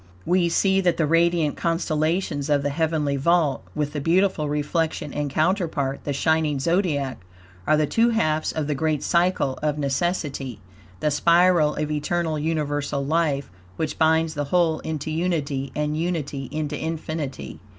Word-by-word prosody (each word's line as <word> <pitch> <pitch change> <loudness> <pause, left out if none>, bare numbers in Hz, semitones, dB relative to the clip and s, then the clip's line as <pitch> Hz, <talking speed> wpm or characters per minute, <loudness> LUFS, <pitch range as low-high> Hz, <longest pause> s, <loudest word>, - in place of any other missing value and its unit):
We 180 -1 +2
see 190 +3 +2
that 175 -2 +1
the 160 - +2
radiant 165 -1 +2
constellations 160 -2 -1
of 145 -1 +2
the 145 - 0
heavenly 155 -2 0
vault, 160 0 +2
with 150 -1 -2
the 145 - -3
beautiful 170 -1 +2
reflection 150 0 -1
and 145 -1 -2
counterpart, 155 -4 0
the 145 - -1
shining 155 0 +1
Zodiac, 145 - 0 0.5
are 155 - +4
the 155 - +2
two 230 +9 +2
halves 155 -9 +1
of 155 -2 -2
the 150 - -1
great 155 +1 -1
Cycle 170 -6 +1
of 150 -1 0
Necessity, 140 - -2 0.4
the 150 - +1
spiral 170 0 +4
of 150 0 -2
eternal, 155 +1 -1
universal 145 -3 -1
life, 145 - 0 0.2
which 160 -1 -3
binds 160 0 +3
the 145 -1 -2
whole 165 0 +2
into 155 -1 -4
unity, 150 -5 -1
and 150 0 -1
unity 155 -5 -3
into 150 -1 -3
infinity. 155 -3 -4
155 Hz, 150 wpm, -24 LUFS, 145-170 Hz, 0.5 s, are